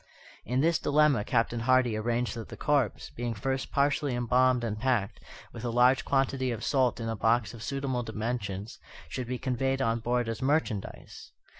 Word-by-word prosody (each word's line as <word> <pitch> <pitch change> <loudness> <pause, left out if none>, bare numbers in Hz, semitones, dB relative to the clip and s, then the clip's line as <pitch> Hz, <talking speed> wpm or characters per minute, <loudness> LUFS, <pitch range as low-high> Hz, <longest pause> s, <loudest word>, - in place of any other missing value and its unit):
In 125 +4 0
this 165 +1 +2
dilemma 145 -6 +3
Captain 115 +1 0
Hardy 125 -1 +3
arranged 120 +2 -1
that 115 -1 -7
the - - -9
corpse, 140 -6 0
being 120 -1 -4
first 130 +5 -3
partially 140 -1 +1
embalmed 125 +1 +2
and 105 -2 -3
packed, 120 -5 0 0.3
with - - -8
a 120 - -1
large 125 +2 +4
quantity 135 -1 +1
of 115 -2 -4
salt 130 -4 +1
in 115 - -4
a 115 - -2
box 115 +2 +1
of 115 - -10
suitable 135 -1 -2
dimensions, 110 -3 -4 0.3
should 125 +8 -4
be 125 +1 -2
conveyed 135 +1 -1
on 115 -2 +1
board 120 +1 0
as 115 -1 -4
merchandise. 130 -7 -2
125 Hz, 175 wpm, -29 LUFS, 115-130 Hz, 0.3 s, large